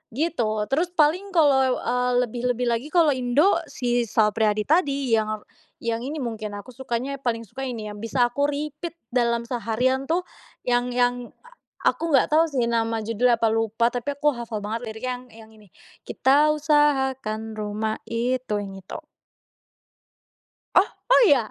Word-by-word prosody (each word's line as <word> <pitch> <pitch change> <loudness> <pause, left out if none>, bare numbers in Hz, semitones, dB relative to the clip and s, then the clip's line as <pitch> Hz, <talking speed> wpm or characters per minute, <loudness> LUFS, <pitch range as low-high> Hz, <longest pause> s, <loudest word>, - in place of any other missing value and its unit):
Gitu, 240 -9 0
terus 325 +6 +1
paling 330 +6 +2
kalau, 270 -5 +4
ah, 250 +1 0
lebih-lebih 245 +1 -2
lagi 235 +4 -2
kalau 325 -2 +4
Indo 265 +9 +2
si 240 -1 -1
Sal 215 0 +3
Priyadi 215 -1 +1
tadi 280 -5 +1
yang, 215 -1 0 0.4
yang 230 -1 -1
ini 280 +5 -4
mungkin 215 -3 -5
aku 205 +5 -10
sukanya 265 +2 -4
paling 230 -3 -1
suka 265 +6 -6
ini, 220 -4 -5
yang 205 - -9
bisa 240 +2 +2
aku 285 +3 +1
repeat 300 +3 -5 0.2
dalam 235 -1 +1
seharian 250 +3 -1
tuh 350 +3 +1 0.4
yang 245 0 +1
yang 245 0 +1 0.2
a - - -17 0.4
aku 330 - -4
nggak 270 -3 +4
tahu 315 +1 +6
sih 260 -5 0
nama 225 -1 0
judulnya 230 +2 +2
apa, 230 - +3
lupa 225 +1 +1
tapi 245 +3 -2
aku 295 0 +2
hafal 235 -2 -5
banget 220 +3 -4
lirik 220 +3 -7
yang 250 0 -3
yang 220 0 -14
ini, 210 -2 -19 0.4
Kita 285 +3 +3
usahakan 265 -7 +1
rumah 215 +1 -3
itu, 240 -1 -1
yang 195 -1 -6
itu. 190 - -8 1.8
Oh! - - +6 0.2
Oh, - - +7
iya? 255 - +3
245 Hz, 160 wpm, -24 LUFS, 225-280 Hz, 1.8 s, Oh